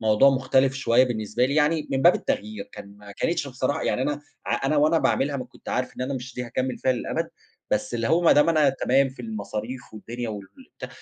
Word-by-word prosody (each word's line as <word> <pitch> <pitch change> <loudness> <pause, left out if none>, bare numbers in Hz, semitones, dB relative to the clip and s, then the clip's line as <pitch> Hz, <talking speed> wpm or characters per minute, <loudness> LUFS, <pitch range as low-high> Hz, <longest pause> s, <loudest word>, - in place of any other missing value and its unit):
موضوع 110 +5 +5
مختلف 130 0 +2
شوية 130 -1 +3
بالنسبة 120 0 -1
لي 140 - -2
يعني 155 +1 +2
من 135 0 0
باب 175 - +7
التغيير، 250 -4 -3
كان 100 +1 -11
ما 100 -1 -12
كانتش 165 +3 -1
بصراحة 130 +4 -2
يعني 125 - 0
أنا 145 +1 -1 0.3
ع - - -1
أنا 150 +2 +1
وأنا 155 +3 +4
باعملها 140 -2 +1
ما 130 - -4
كنت - - -15
عارف 125 0 -2
إن - - -3
أنا 135 +2 -2
مش 130 -1 -7
دي 125 - -4
هاكمّل 130 +2 -3
فيها 130 - +2
للأبد، 125 - -3 0.4
بس - - -1
اللي 115 -1 -1
هو 165 - +3
ما 170 - +6
دام 150 +2 +4
أنا 155 -4 +4
تمام 135 +1 +2
في 130 - -11
المصاريف 125 - -6
والدنيا 120 +2 -6
والبتاع 105 - -9
130 Hz, 220 wpm, -25 LUFS, 120-150 Hz, 0.4 s, باب